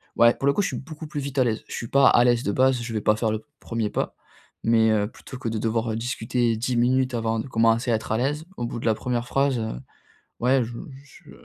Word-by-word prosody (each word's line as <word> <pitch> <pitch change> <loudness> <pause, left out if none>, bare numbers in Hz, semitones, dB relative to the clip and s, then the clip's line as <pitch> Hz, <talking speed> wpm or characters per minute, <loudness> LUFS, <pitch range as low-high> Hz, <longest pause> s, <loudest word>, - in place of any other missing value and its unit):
ouais 120 0 +6
pour 135 - -2
le 140 - +4
coup 205 - +1
je - - +1
suis 130 - -4
beaucoup 155 +3 -9
plus 150 -1 -4
vite 140 0 -6
à 130 - +5
l'aise. 115 -2 -1
Je - - -8
suis 115 - -5
pas 140 +2 +5
à 120 - +5
l'aise 120 -1 +3
de 100 - 0
base, 130 +2 +2
je 115 - -5
vais 110 - 0
pas 105 +1 +3
faire 110 0 0
le 110 +4 -4
1er 115 -2 -2
pas, - - -2 0.5
mais, 115 -1 +4
heu, 105 -1 +2
plutôt 125 +3 -11
que 120 - -5
de 110 -1 -2
devoir, 115 +1 -1
heu, - - -2
discuter 115 0 -1
10 125 +2 -1
minutes 130 +2 +2
avant 115 -1 -1
de 125 - -4
commencer 115 0 +2
à - - +4
être 110 0 -5
à 110 - +2
l'aise, 145 +5 -1
au 120 - -2
bout 120 0 -5
de - - -7
la 110 - +3
1re 120 +1 -2
phrase, 135 -2 +1
heu, 110 - -4 0.6
ouais 125 +1 +3
je 115 - -7 0.3
j 140 - -18
je - - -14
120 Hz, 280 wpm, -24 LUFS, 115-130 Hz, 0.6 s, ouais